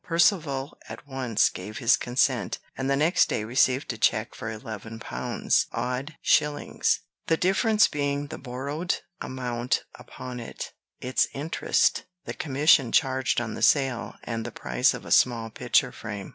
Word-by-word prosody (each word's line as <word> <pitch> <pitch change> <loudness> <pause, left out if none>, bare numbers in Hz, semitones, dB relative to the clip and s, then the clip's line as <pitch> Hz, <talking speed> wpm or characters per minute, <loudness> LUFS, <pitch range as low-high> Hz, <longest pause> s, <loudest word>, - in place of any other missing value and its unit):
Percivale 160 -5 +1
at - - -9
once 130 -5 +1
gave 105 +4 -8
his 120 0 +4
consent, 125 +1 0 0.2
and 135 0 -2
the 140 - +3
next 165 +5 +3
day 105 - -1
received 125 +3 +2
a 110 - -11
check 110 0 +1
for 110 - -6
eleven 110 0 -7
pounds, - - 0
odd 125 +5 -3
shillings; 150 0 +2 0.3
the 160 - +3
difference 210 +4 +3
being 145 0 -1
the 145 - -8
borrowed 140 +7 -3 0.3
amount 125 -1 -2
upon 125 -1 -8
it, 115 - -7 0.3
its 130 +1 +1
interest, 150 +4 +1 0.2
the - - -4
commission 140 -3 +3
charged 130 0 +2
on 115 -2 -4
the - - -6
sale, 130 -1 +2
and 115 -1 -3
the - - -6
price - - +1
of - - -9
a - - -8
small 115 -3 +3
picture - - +2
frame. 105 -4 -7
130 Hz, 155 wpm, -26 LUFS, 115-145 Hz, 0.3 s, his